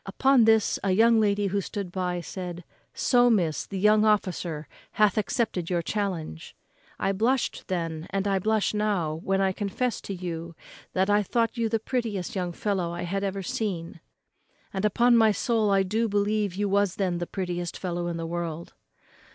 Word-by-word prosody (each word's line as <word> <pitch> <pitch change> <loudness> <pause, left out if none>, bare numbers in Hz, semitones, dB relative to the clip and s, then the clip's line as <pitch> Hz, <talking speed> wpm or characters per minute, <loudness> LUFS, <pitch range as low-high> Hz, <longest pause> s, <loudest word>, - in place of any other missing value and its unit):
Upon 260 +4 +4
this 220 -1 +3
a 195 - +1
young 225 +3 +5
lady 205 -1 +2
who 200 +1 0
stood 195 -1 -5
by 180 -1 -2
said, 180 0 -6 0.3
'So, 245 -1 +3
miss, 175 -9 +1
the 195 - -5
young 210 +2 +4
officer 180 -7 0 0.3
hath 210 -2 +3
accepted 215 -5 -1
your 175 -2 0
challenge.' 175 - -4 0.4
I 195 - 0
blushed 230 +6 0
then, 165 -3 -3
and 195 0 -1
I 195 -1 +2
blush 215 +2 +1
now, 205 -7 0
when 195 0 +1
I 190 -1 +2
confess 205 +5 -2
to 200 - -5
you 170 -2 -6 0.4
I 205 +2 +3
thought 230 +3 0
you 230 -2 0
the 225 - +1
prettiest 220 -5 -3
young 180 -2 -2
fellow 185 -2 -1
I 175 - -4
had 195 +3 -2
ever 195 0 -2
seen; 175 -4 -3 0.7
and, 195 +1 -1
upon 240 +4 +4
my 220 -1 +5
soul, 220 0 +1
I 195 -1 +4
believe 205 -1 0
you 205 +1 0
was 200 -1 +1
then 180 -3 -1
the 175 - -3
prettiest 175 -2 -4
fellow 175 -1 -3
in 170 -1 -3
the 165 - -4
world." 170 -1 -4
195 Hz, 175 wpm, -26 LUFS, 175-215 Hz, 0.7 s, young